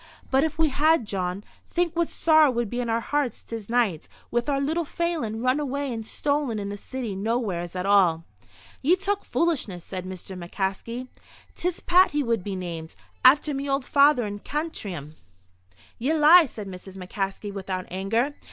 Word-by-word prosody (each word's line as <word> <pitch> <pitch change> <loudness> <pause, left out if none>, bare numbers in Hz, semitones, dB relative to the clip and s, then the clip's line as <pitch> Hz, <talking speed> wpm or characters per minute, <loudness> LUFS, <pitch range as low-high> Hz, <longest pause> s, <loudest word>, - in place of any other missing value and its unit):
"But 265 +1 +4
if 315 -1 -1
we 320 -1 +3
had, 305 -1 +3
Jawn, 190 -1 -3 0.3
think 345 -1 0
what 340 -1 +1
sorrow 315 -2 +5
would 235 -4 -1
be 245 - -2
in 240 -1 -2
our 230 +1 +1
hearts 290 -1 -1
this 225 -3 -7
night, 225 -10 +1 0.2
with 240 +3 0
our 275 -1 +1
little 315 +5 0
Phelan 300 -9 -2
run 255 +3 +2
away 280 -2 -2
and 225 -1 -4
stolen 285 -5 -1
in 200 -1 -3
the 205 - -4
city 235 0 -5
nowheres 195 -5 -2
at 180 0 -2
all." 185 -5 +4 0.6
"Ye 320 +7 +4
talk 395 +2 -1
foolishness," 245 - -1
said 185 -1 -6
Mr. 190 0 -8
McCaskey. 195 +7 -4 0.5
"'Tis 355 0 -2
Pat 365 +2 +5
he 295 0 +1
would 230 -6 0
be 200 0 -4
named, 170 -3 -6 0.3
after 290 +3 +6
me 275 +1 -3
old 275 -1 0
father 280 -4 +4
in 205 0 -5
Cantrim." 200 - -5 0.8
"Ye 265 +7 +1
lie!" 315 +2 +8
said 210 -4 -8
Mrs. 190 0 -9
McCaskey, 195 +2 -4
without 185 -2 -4
anger. 225 +9 0
235 Hz, 175 wpm, -25 LUFS, 195-295 Hz, 0.8 s, lie